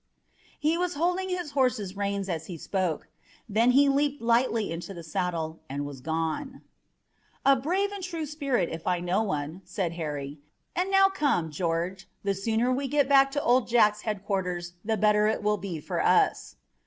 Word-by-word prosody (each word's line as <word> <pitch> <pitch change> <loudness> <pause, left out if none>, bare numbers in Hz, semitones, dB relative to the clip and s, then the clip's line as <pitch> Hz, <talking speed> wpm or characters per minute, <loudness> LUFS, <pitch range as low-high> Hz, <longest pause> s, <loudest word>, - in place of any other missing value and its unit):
He 315 +3 +1
was 360 -2 -1
holding 360 +4 0
his 355 -5 -3
horse's 245 -9 0
reins 200 -1 -2
as 165 -4 -3
he 175 - -6
spoke. 180 -1 -2 0.4
Then 225 +3 +3
he 275 +3 +5
leaped 285 +1 +1
lightly 230 -3 +2
into 175 +4 -6
the 170 - -8
saddle 165 -1 -2
and 140 +1 -3
was 140 -3 -8
gone. 165 - -3 0.8
"A 275 0 +7
brave 365 +10 0
and 400 -2 -6
true 335 -3 -3
spirit, 275 - 0
if 165 0 -7
I 180 -1 +2
know 180 +4 +1
one," 160 -3 -3
said 185 -6 -2
Harry. 150 -3 -5 0.4
"And 360 +2 0
now 390 0 +6
come, 285 - 0
George, 170 +4 -2
the 200 -1 +1
sooner 225 +5 0
we 275 +2 -1
get 285 0 +2
back 275 -1 +6
to 290 - -1
Old 245 +1 +3
Jack's 210 -3 +4
headquarters 190 -5 -3
the 220 0 0
better 210 0 +4
it 220 - 0
will 210 0 +2
be 180 -4 -5
for - - -2
us." - - +2
210 Hz, 180 wpm, -27 LUFS, 175-275 Hz, 0.8 s, A